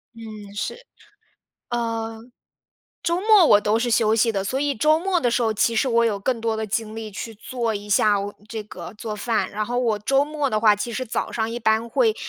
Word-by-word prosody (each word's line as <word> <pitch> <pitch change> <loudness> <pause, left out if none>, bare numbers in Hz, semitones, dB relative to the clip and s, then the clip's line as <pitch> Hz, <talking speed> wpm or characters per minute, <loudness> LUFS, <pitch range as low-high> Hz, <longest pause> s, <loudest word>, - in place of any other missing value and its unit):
嗯， 215 -3 -10
是。 475 - -4 0.9
呃， 230 -1 -3 0.8
周 340 +1 0
末 420 -3 +6
我 205 - +6
都 210 +2 +1
是 240 +1 -1
休 220 -1 +3
息 225 +1 +2
的， 195 -2 -1
所 255 +7 -2
以 285 0 0
周 305 +7 +3
末 365 0 0
的 245 - +1
时 240 +1 +1
候， 225 -1 +2
其 230 +2 +1
实 260 - +2
我 235 -1 +3
有 215 -3 0
更 235 +3 -1
多 225 -1 -1
的 220 0 -3
精 220 +1 -3
力 220 -1 -6
去 225 +3 -7
做 230 +1 -3
一 205 0 -6
下 205 0 +4
我 200 +1 -5
这 220 -1 -5
个 180 -3 -9
做 215 0 -5
饭。 220 +1 -1
然 210 +1 -3
后 245 +1 -1
我 230 -4 +1
周 270 +7 +2
末 295 -1 -2
的 215 - 0
话， 215 -1 +5
其 210 +3 -4
实 255 +3 -3
早 240 - -3
上 220 -1 -1
一 235 - -4
般 220 0 +1
会 445 - +2
225 Hz, 245 characters per minute, -23 LUFS, 215-245 Hz, 0.9 s, 末